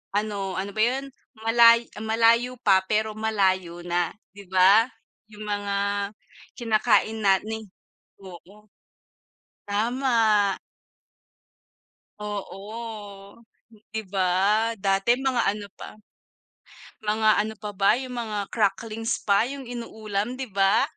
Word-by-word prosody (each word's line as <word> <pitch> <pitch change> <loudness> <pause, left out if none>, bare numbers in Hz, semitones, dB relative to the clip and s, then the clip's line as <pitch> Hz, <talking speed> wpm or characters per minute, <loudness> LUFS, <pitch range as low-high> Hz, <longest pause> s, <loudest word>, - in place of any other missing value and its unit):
ano, 200 -2 -2
ano 195 +1 -3
ba 215 - 0
yun, 265 +4 0 0.3
malay 230 +1 +6
ah, - - -6
"Malayo 230 +3 +3
pa, 190 -2 +5
pero 215 +1 0
malayo 190 -5 0
na." 175 -1 0 0.2
'Di 200 -1 -13
ba, 195 +5 +5 0.4
yung 210 0 -9
mga 205 -1 -2 0.8
kinakain 225 -1 +2
na 195 -1 +4
ni 220 0 -4 0.6
oo, 195 +3 -13 1.0
tama. 220 -2 +2 1.7
Oo, 205 0 -7 0.5
‘di 220 - -2
ba. 195 +4 +1
Dati 195 +3 +2
mga 260 -2 0
ano 205 0 -2
pa - - -9 1.1
mga 215 +1 +2
ano 215 +1 -1
pa 210 0 -7
ba 195 0 +3
yung 255 -1 -6
mga 210 -3 -4
cracklings 225 +3 -1
pa 200 +3 +3
yung 275 0 -7
inuulam 220 -2 -4
'di 260 -1 -6
ba? 195 +1 +3
215 Hz, 110 wpm, -25 LUFS, 200-230 Hz, 1.7 s, malay